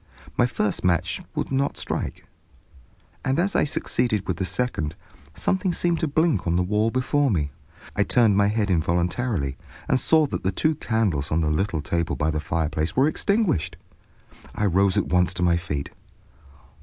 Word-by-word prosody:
My 120 - +3
first 105 -4 -1
match 85 -2 +1
would - - -2
not 135 +1 0
strike, - - -4 1.0
and 135 0 0
as 195 +4 +1
I - - +4
succeeded 115 -7 -1
with 90 - -1
the 95 - -1
second, 90 -5 -2 0.4
something 190 -1 0
seemed 170 -1 0
to 160 - 0
blink 155 - +1
on 85 - +2
the 90 - +2
wall 105 +4 +1
before 135 +3 +1
me. 75 -9 0 0.4
I - - +1
turned 115 -5 +4
my 100 0 +4
head 105 -1 0
involuntarily 85 - 0 0.3
and 130 - +2
saw 160 +2 +4
that 140 - -4
the 95 - 0
two 155 +8 +1
candles 105 - -1
on 80 +2 +2
the 75 -1 +1
little 80 -1 -1
table 85 +1 -1
by 80 +1 0
the 75 - -1
fireplace 80 0 -2
were 135 +3 +4
extinguished. 200 - 0 0.8
I 105 - 0
rose 95 0 +3
at - - +2
once 90 0 +2
to 90 - -1
my 85 -1 +4
feet. 75 -5 -4
100 Hz, 175 wpm, -24 LUFS, 85-130 Hz, 1.0 s, I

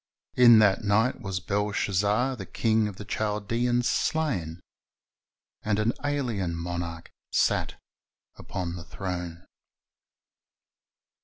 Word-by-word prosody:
"In 120 -2 +8
that 100 -2 +4
night 110 +5 +2
was 95 -4 -3
Belshazzar 105 +5 0
the 95 -6 -8
king 110 -1 +1
of 105 - -7
the 105 - -9
Chaldeans 115 +4 0
slain, 120 - 0
"^ - - -19 1.0
and 105 -1 0
an 110 +2 +1
alien 120 -12 -1
monarch 85 -1 -5 0.2
sat - - +1 0.6
upon 90 -2 -5
the 85 - -8
throne. 90 -1 -6
105 Hz, 105 wpm, -27 LUFS, 90-115 Hz, 1.0 s, In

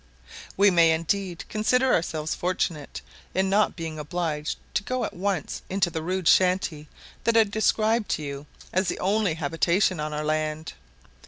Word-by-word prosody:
We 200 +1 +6
may 165 -2 +5
indeed 175 +2 -2
consider 250 +4 +2
ourselves 160 -2 -1
fortunate 170 -4 -2 0.3
in 190 +1 +1
not 210 +2 +3
being 160 -2 -5
obliged 150 0 -3 0.2
to - - +1
go 255 +4 -2
at - - -6
once 185 -3 -2
into 190 -2 +1
the 160 - -3
rude 185 +1 -2
shanty 180 -5 +2 0.3
that 230 0 +3
I 225 - +8
described 220 +1 +1
to 155 - -7
you 140 0 -6 0.3
as 185 +1 +1
the - - -1
only 200 -3 +1
habitation 170 +4 +1
on 150 0 -3
our 150 0 -3
land. 155 0 -2
175 Hz, 160 wpm, -25 LUFS, 155-200 Hz, 0.3 s, I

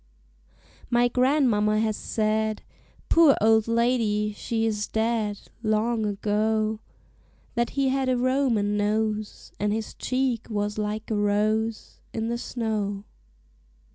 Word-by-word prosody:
My 240 0 +3
grandmamma 245 -5 +2
has 220 -1 0
said 215 0 -1 0.4
Poor 325 -4 +6
old 220 0 +4
lady! 230 -3 +1
she 225 +2 -2
is 210 -2 -1
dead 220 -2 -1 0.2
Long 220 0 +1
ago 215 +1 0 0.7
That 235 -1 0
he 275 -1 +3
had 265 0 0
a 255 - +2
Roman 245 -5 +1
nose, 215 0 -1
And 210 0 0
his 220 0 -3
cheek 255 -3 -1
was 210 -1 -2
like 215 +1 -3
a - - +1
rose 215 +2 0
In 225 0 -2
the 235 0 -2
snow. 210 -5 -3
220 Hz, 120 wpm, -25 LUFS, 210-235 Hz, 0.7 s, Poor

